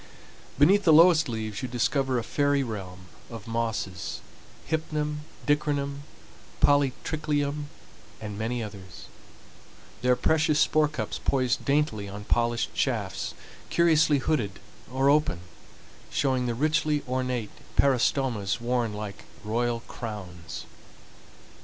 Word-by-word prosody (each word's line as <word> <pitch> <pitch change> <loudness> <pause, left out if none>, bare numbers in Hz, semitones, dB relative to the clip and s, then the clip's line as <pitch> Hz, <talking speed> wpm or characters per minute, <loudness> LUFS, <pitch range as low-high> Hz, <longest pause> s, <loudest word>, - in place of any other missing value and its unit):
Beneath 190 +9 +5
the 165 - +5
lowest 165 -1 +6
leaves 110 -2 -4
you 130 - -3
discover 130 +2 0
a 115 - -1
fairy 145 +1 +1
realm 95 -6 -6 0.3
of 115 -3 -8
mosses,—hypnum, 150 - -3 0.3
dicranum, 145 -1 0 0.5
polytriclium, 145 +1 +1 0.5
and 105 -2 -6
many 115 +3 -2
others,—their 105 +5 -6
precious 155 +2 +2
spore 155 -1 +4
cups 150 - -4
poised 130 -3 +1
daintily 140 -8 +1
on 100 +1 -7
polished 120 +2 0
shafts, - - -1 0.3
curiously 160 -3 +4
hooded, 125 -8 -1 0.3
or 135 +1 +2
open, 145 - +3 0.7
showing 130 -3 +1
the 120 - -1
richly 150 +2 +1
ornate 125 -3 -2 0.2
peristomas 125 -6 +2
worn 120 -2 0
like 105 -1 -7 0.2
royal 115 +2 0
crowns. 90 -9 -7
125 Hz, 105 wpm, -27 LUFS, 110-150 Hz, 0.7 s, lowest